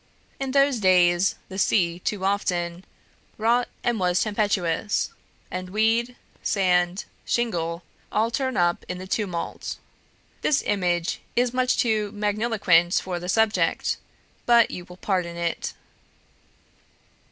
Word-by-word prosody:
In 270 -1 -2
those 275 -2 +3
days, 180 -1 +4
the 190 0 -6
sea 175 -4 +2
too 190 +1 -2
often 180 -3 -1 0.5
'wrought 235 +3 +2 0.2
and 240 -3 +1
was 180 0 +2
tempestuous,' 205 -3 0 0.4
and 185 0 -4
weed, 225 +4 +1 0.3
sand, 180 -1 +1 0.2
shingle 170 -8 -1 0.3
all 220 +2 +1
turned 260 +1 -1
up 175 -1 +2
in 180 - -3
the 185 - -7
tumult. 190 -3 -3 0.6
This 290 - +2
image 175 -4 0
is 245 0 +2
much 255 0 +2
too 215 -3 +1
magniloquent 205 -5 +2
for 180 -2 -4
the 180 +1 -6
subject, 220 +2 +2 0.5
but 235 -1 +5
you 175 - -6
will 180 0 -13
pardon 180 -4 -1
it." 170 -1 -2
195 Hz, 120 wpm, -25 LUFS, 175-225 Hz, 0.6 s, but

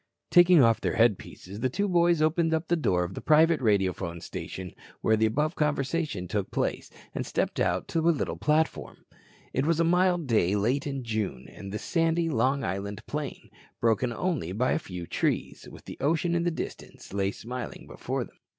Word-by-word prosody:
Taking 175 -4 +7
off 115 -1 +3
their - - -1
headpieces, 105 -3 0
the 130 - +1
two 200 +10 -1
boys 170 -3 +3
opened 160 +1 +2
the 160 +2 +1
door 90 - +1
of 90 +2 -5
the - - -6
private 160 +1 +4
radiophone 95 -6 0
station 90 +2 -7 0.3
where 110 - +3
the 110 +1 +3
above 150 +8 0
conversation 145 - -1
took 100 +1 -2
place - - -2 0.2
and - - -2
stepped - - -2
out 90 0 0
to 165 - 0
a 165 +1 +3
little 160 - 0
platform. 155 +1 -1 0.5
It 130 +4 0
was 165 -1 +2
a - - +4
mild 175 0 +2
day 105 -6 +2
late 125 +8 0
in 135 -2 -3
June, 110 - -3
and 100 -1 -9
the 105 - -3
sandy 165 +4 +1
Long 135 +2 +1
Island 100 +4 -4
plain, 150 -2 -5 0.3
broken 115 +1 +2
only 140 - -2
by 125 +6 +1
a - - +1
few 90 -2 -7
trees, - - -2
with - - -13
the - - -9
ocean 165 +4 +1
in 170 0 +1
the - - +3
distance, 160 - -7
lay 100 -1 +1
smiling 120 +4 -7
before - - -4
them. - - -16
130 Hz, 185 wpm, -27 LUFS, 100-165 Hz, 0.5 s, Taking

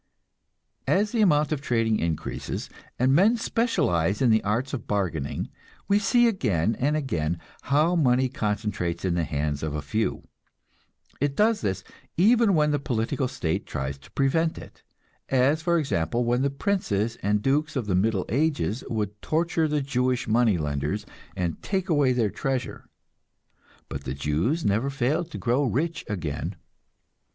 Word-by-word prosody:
As 205 +2 +2
the 230 - +1
amount 150 -7 +3
of 150 -3 -1
trading 115 -5 +1
increases, 85 -2 -3 0.3
and 130 +2 +3
men 205 +10 +5
specialize 105 - +1
in 125 -3 +4
the 110 0 +3
arts 115 +7 -1
of 125 - -4
bargaining, 85 -9 -2 0.4
we 200 +1 +4
see 240 +3 +4
again 115 - +1
and 145 +4 +2
again 85 - -1 0.3
how 155 +5 +3
money 130 -5 +3
concentrates 105 -7 -2
in 90 - +1
the 85 -1 +1
hands 75 0 -2
of 75 -1 -3
a 75 - -2
few. 110 +10 -2 0.9
It 140 0 0
does 215 +1 +3
this, 95 -2 -2 0.3
even 220 +2 +5
when 150 -1 +3
the 145 - +1
political 125 0 -1
state 80 -9 -2
tries 70 +1 -4
to - - -17
prevent 160 +4 +1
it; - - -12 0.5
as, 135 +4 +3
for 170 +1 +2
example, 120 - 0
when 120 +2 +1
the 140 - +2
princes 135 - -1
and 105 +1 0
dukes 150 +3 +1
of 130 -5 -1
the 100 - -1
Middle 95 +1 +1
Ages 130 - 0
would 105 -2 -3
torture 165 0 +1
the 150 -1 0
Jewish 125 -2 0
money 110 -3 +3
lenders 75 +6 -2 0.3
and 85 -3 -2
take 190 -1 -2
away 145 -5 +3
their 115 -5 +1
treasure, 130 -2 -3 1.0
but 70 - -6
the 65 - -3
Jews 80 - 0
never 110 +7 +1
failed 140 +5 0
to 165 - -7
grow 125 +4 +1
rich 155 +6 -1
again. 85 -8 -3
125 Hz, 160 wpm, -26 LUFS, 95-150 Hz, 1.0 s, men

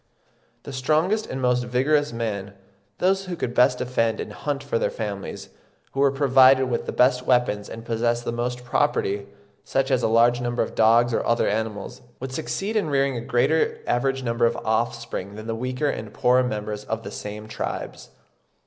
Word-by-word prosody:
The 140 - -8
strongest 160 - +1
and 130 - -4
most 125 -1 +2
vigorous 140 +5 +1
men—those 100 - -3
who 180 -1 -4
could 125 -8 -3
best 125 +1 +4
defend 115 -3 0
and 105 - -5
hunt 145 +4 -3
for 475 - -1
their - - +1
families, - - -5 0.4
who 135 - -5
were 140 0 +5
provided 135 -1 +5
with 120 - -2
the - - -1
best 125 0 +2
weapons 120 -5 +2
and 115 0 -8
possessed 120 +1 0
the - - -1
most 125 +1 -3
property, 100 -6 0 0.4
such 135 0 0
as 130 -2 +3
a - - +2
large 120 +2 +4
number 120 0 0
of - - -7
dogs 115 +2 +4
or - - +1
other 115 0 +1
animals,—would 110 +4 -4
succeed 130 - -3
in 200 -8 +1
rearing 140 -1 +1
a 120 - -3
greater 130 +7 +1
average 135 +2 0
number 115 -1 +2
of 115 - -2
offspring 110 -3 -2
than 110 +1 -8
the 115 - -2
weaker 125 +5 -2
and 110 -6 -4
poorer 125 +1 +4
members 105 -3 -3
of 110 0 -3
the - - -7
same 105 +1 -7
tribes. 110 - -5
120 Hz, 180 wpm, -24 LUFS, 115-135 Hz, 0.4 s, were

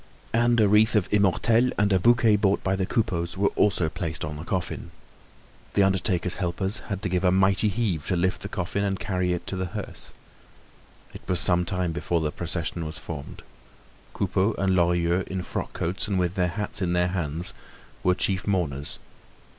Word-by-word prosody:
And 120 +1 +3
a 105 - +5
wreath 105 +3 +4
of 105 -4 +2
immortelles 110 +5 +3
and 100 -1 +3
a 95 - +4
bouquet 115 +1 +5
bought 100 -1 +1
by 95 0 +1
the 95 -1 -1
Coupeaus 90 -7 -1
were 100 +1 +3
also 90 -5 +2
placed 80 0 -3
on 75 0 -5
the 75 - -7
coffin. 90 -1 -3 0.9
The 100 - +5
undertaker's 95 -2 +1
helpers 95 +4 -1
had 100 -1 -4
to - - +1
give 90 0 0
a 90 - +4
mighty 95 +3 +4
heave 100 -7 -1
to 95 - +1
lift 90 +1 0
the 100 - -5
coffin 100 +1 -2
and 95 -1 -1
carry 90 -3 -1
it 90 - -2
to - - -3
the 95 0 -2
hearse. - - -5 1.0
It - - -9
was 90 -2 +2
some 90 +1 +2
time 90 -1 -1
before 85 +1 -1
the 75 -2 -1
procession 85 +1 -2
was 80 -1 -4
formed. 75 -2 -8 0.7
Coupeau 100 +4 0
and 95 -1 +2
Lorilleux, 85 0 +2
in 95 -1 -3
frock - - -4
coats 90 +6 -2
and 100 -3 0
with 90 -1 0
their 90 -2 +1
hats 105 +3 -2
in 90 -2 0
their 90 0 +2
hands, 85 -2 -3 0.5
were 90 0 +3
chief 95 +1 -1
mourners. 75 -8 -1
95 Hz, 190 wpm, -25 LUFS, 85-100 Hz, 1.0 s, a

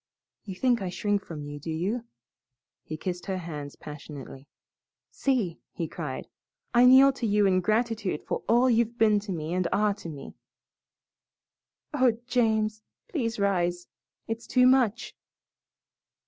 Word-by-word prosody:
You 195 -3 -6
think 240 +2 +2
I 190 - -2
shrink 205 +2 -1
from 155 -3 -7
you, 145 0 -7
do 155 - -7
you?" 170 +6 -1
and 235 - -9 0.8
he 155 - -7
kissed 180 +2 -5
her 190 -1 -1
hands 150 -5 -6
passionately. 145 -2 -10 0.6
"See," 235 -11 0
he 165 - -3
cried, 150 -5 -6 0.5
"I 240 +1 +6
kneel 265 +2 +8
to 245 -3 -3
you 210 0 +3
in 185 -1 +3
gratitude 215 -3 0
for - - -2
all 240 +3 +5
you've 235 -1 +2
been 215 -2 +4
to 205 -1 -7
me 160 -1 -3
and 180 -1 +1
are 210 0 +2
to 185 -4 -9
me." 140 -3 -9 1.6
"Oh, 255 -5 +3
James! 220 -3 +1 0.3
Please 230 - -2
rise. 175 -3 0 0.4
It's 225 +1 -5
too 250 -1 +4
much." 250 -4 +2
205 Hz, 150 wpm, -27 LUFS, 170-235 Hz, 1.6 s, kneel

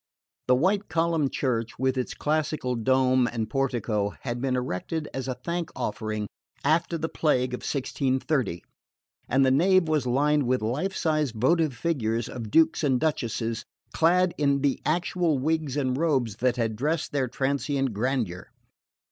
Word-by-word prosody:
The 125 - +5
white 195 +9 +1
columned 165 -3 +1
church 115 -4 -1
with 130 +1 +1
its 130 -1 -3
classical 150 -4 -1
dome 130 +1 +3
and 115 -2 -2
portico 115 -6 -1
had 120 -1 -4
been 130 -1 0
erected 125 - -3
as 135 -1 -4
a 130 - -2
thank 170 -1 -2
offering 110 -3 -3 0.4
after 165 +1 +2
the 160 0 -2
plague 130 -6 +1
of 125 - -3
1630, 130 - -1 0.7
and 135 0 +4
the 130 - +4
nave 180 +5 +4
was 150 -5 +1
lined 145 +2 +2
with 125 -2 +1
life 150 - -1
sized 155 -6 0
votive 150 +4 +2
figures 115 -6 -1
of 115 -4 -6
Dukes 160 +5 +3
and 130 -4 +2
Duchesses 115 -6 -1 0.3
clad 180 +2 +3
in 140 -2 +2
the 140 -1 +1
actual 170 -1 +1
wigs 150 0 -1
and 130 -3 0
robes 130 -9 0
that 125 0 +1
had 115 -3 -1
dressed 150 +7 -1
their 140 -3 0
transient 135 0 -1
grandeur. 110 -5 -2
135 Hz, 155 wpm, -26 LUFS, 125-155 Hz, 0.7 s, The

